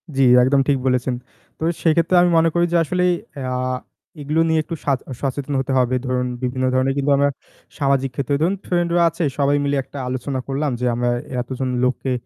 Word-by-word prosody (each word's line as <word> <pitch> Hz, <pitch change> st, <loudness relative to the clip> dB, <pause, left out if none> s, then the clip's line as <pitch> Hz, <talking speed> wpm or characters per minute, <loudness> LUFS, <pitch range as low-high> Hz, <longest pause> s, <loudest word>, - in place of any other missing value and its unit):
জ্বী, 135 Hz, -, +3 dB, 0.2 s
একদম 135 Hz, +1 st, +3 dB
ঠিক 140 Hz, -2 st, +3 dB
বলেছেন। 125 Hz, 0 st, +1 dB, 0.4 s
তো -, -, -31 dB
এ -, -, +2 dB
সেক্ষেত্রে 170 Hz, +2 st, +3 dB
আমি 175 Hz, -, +4 dB
মনে 165 Hz, 0 st, +4 dB
করি 175 Hz, 0 st, +3 dB
যে -, -, +5 dB
আসলে 180 Hz, +3 st, -1 dB, 0.5 s
আ -, -, -2 dB, 0.7 s
এগুলো 155 Hz, +3 st, 0 dB
নিয়ে 160 Hz, 0 st, +3 dB
একটু 165 Hz, -, -5 dB
সাচ 135 Hz, -3 st, +1 dB, 0.2 s
সচেতন 140 Hz, +1 st, -3 dB
হতে 135 Hz, +1 st, -2 dB
হবে। 125 Hz, 0 st, +1 dB
ধরুন, 125 Hz, 0 st, 0 dB, 0.2 s
বিভিন্ন 130 Hz, +1 st, -1 dB
ধরনের 130 Hz, +1 st, +2 dB
কিন্তু 140 Hz, +1 st, +1 dB
আমরা 140 Hz, 0 st, +3 dB, 0.5 s
সামাজিক 135 Hz, -1 st, +1 dB
ক্ষেত্রে 140 Hz, +1 st, -1 dB
ধরুন 180 Hz, +4 st, +2 dB
ফ্রেন্ড 175 Hz, -1 st, +1 dB
রা -, -, +4 dB
আছে 165 Hz, +2 st, -4 dB
সবাই 145 Hz, 0 st, +2 dB
মিলে 140 Hz, 0 st, 0 dB
একটা 140 Hz, -, -12 dB
আলোচনা 130 Hz, +1 st, -3 dB
করলাম। 140 Hz, +1 st, -1 dB
যে 125 Hz, -, -1 dB
আমরা 120 Hz, 0 st, 0 dB, 0.3 s
এতজন 130 Hz, +1 st, -4 dB
লোককে 130 Hz, +1 st, 0 dB
140 Hz, 195 wpm, -20 LUFS, 130-155 Hz, 0.7 s, যে